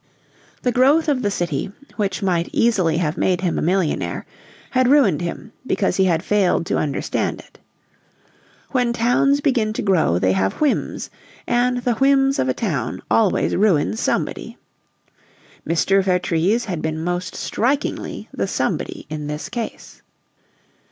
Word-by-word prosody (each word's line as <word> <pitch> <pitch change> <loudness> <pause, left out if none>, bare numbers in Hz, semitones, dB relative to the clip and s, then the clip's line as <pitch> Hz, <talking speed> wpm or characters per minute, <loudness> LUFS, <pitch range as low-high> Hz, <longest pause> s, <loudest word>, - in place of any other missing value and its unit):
The 250 - +2
growth 275 +7 +4
of 280 -4 +1
the 205 - 0
city, 175 -1 -2 0.2
which 205 -1 -2
might 175 -3 0
easily 185 -9 +2
have 165 -1 -1
made 180 -1 +1
him 180 -3 0
a - - -2
millionaire, 180 0 -1 0.5
had 255 -1 +3
ruined 245 - +4
him 175 +6 -5 0.2
because 195 -7 0
he 190 - +4
had 170 -2 +1
failed 200 -5 +2
to - - 0
understand 145 -3 -2
it. - - -17 1.1
When 245 -3 +1
towns 245 +5 +2
begin 240 -7 +1
to - - -3
grow 170 - +2
they 95 +1 +2
have 95 0 +1
whims, 300 -3 -1 0.3
and 245 0 +1
the 245 - +2
whims 270 +2 +3
of 130 - +1
a - - +2
town 145 - -3
always 215 -4 +2
ruin 165 - +2
somebody. - - -2 1.1
Mr. 195 +4 +2
Vertrees 180 +4 +1
had 180 -7 -4
been 160 0 -3
most 175 +1 -3
strikingly 275 +6 -2
the - - -2
somebody 345 -4 -2
in 150 -1 -5
this 150 +1 -5
case. 235 -2 -6
195 Hz, 145 wpm, -21 LUFS, 165-245 Hz, 1.1 s, growth